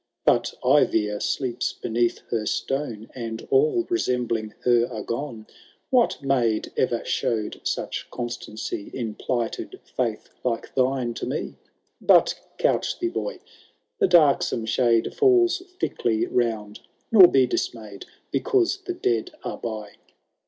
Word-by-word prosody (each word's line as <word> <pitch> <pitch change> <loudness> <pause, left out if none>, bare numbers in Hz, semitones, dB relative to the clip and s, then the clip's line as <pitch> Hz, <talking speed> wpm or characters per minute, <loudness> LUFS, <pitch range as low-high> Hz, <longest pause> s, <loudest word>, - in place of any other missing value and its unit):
But - - +2
Eivir 110 -6 +3
sleeps 125 -1 -1
beneath 120 0 -1
her 110 -2 -1
stone, 125 -6 -3
And 115 -3 -6
all 410 -4 +3
resembling 120 - -1
her 120 -1 +3
are 110 -3 -5
gone. 115 -3 -5 0.5
What 245 - +2
maid 120 -5 +1
e^er 120 -2 0
showed 110 -3 -1
such - - -3
constancy 120 -4 -5
In 115 -4 -3
plighted 120 0 -3 0.2
faith, - - -2
like 120 -2 -2
thine 130 -2 +1
to - - -5
me? 135 +4 -3 0.5
But - - +5 0.2
couch - - +1
thee, 350 - -1
boy; - - -4 0.6
the - - +4
darksome 150 -9 +4
shade 115 0 +2
Falls 370 -2 +4 0.2
thickly 110 -2 0
round, 110 -3 -1 0.3
nor 195 -5 +10
be 135 -5 +4
dismayM 110 -4 -4 0.3
Because 395 -5 +2
the 360 - -2
dead 115 - 0
are - - -5
by. 110 -3 -6
120 Hz, 125 wpm, -24 LUFS, 110-145 Hz, 0.6 s, nor